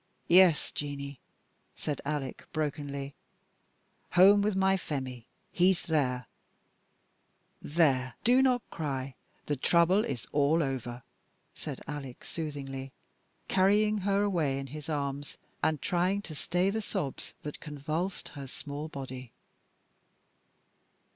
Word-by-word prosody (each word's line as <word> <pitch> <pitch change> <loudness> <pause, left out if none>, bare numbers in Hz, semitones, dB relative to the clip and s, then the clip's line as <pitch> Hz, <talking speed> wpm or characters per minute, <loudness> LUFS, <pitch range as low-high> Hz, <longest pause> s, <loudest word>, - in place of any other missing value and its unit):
"Yes, 175 -3 +6
Jeanie," 140 -1 -5 0.6
said 150 -3 -3
Alec, 145 -2 -3
brokenly, 145 -2 -3 1.0
"home 195 +3 +8
with 205 -1 +1
my 190 0 +4
Phemie: 130 -9 -4 0.3
he's 185 0 +3
there. 130 -6 +1 1.4
There, 135 -5 +2
do 250 +3 +6
not 250 -3 +2
cry; 135 -4 -3 0.3
the 145 - 0
trouble 170 +8 +4
is 130 - -3
all 150 +3 +3
over," 125 -3 -4 0.5
said - - -6
Alec, 135 -3 -6
soothingly, 135 -4 -5 0.6
carrying 210 +3 +4
her 200 +1 +2
away 165 -9 +1
in 135 - -4
his 150 0 -7
arms, 145 -1 -3 0.2
and 155 -2 +2
trying 185 +2 +1
to 160 - -7
stay 180 +5 +1
the 220 +2 -1
sobs 140 -9 -4
that 150 - -6
convulsed 155 +5 -3
her 140 -2 -8
small 145 +3 -6
body. 130 -4 -7
150 Hz, 115 wpm, -30 LUFS, 135-185 Hz, 1.4 s, home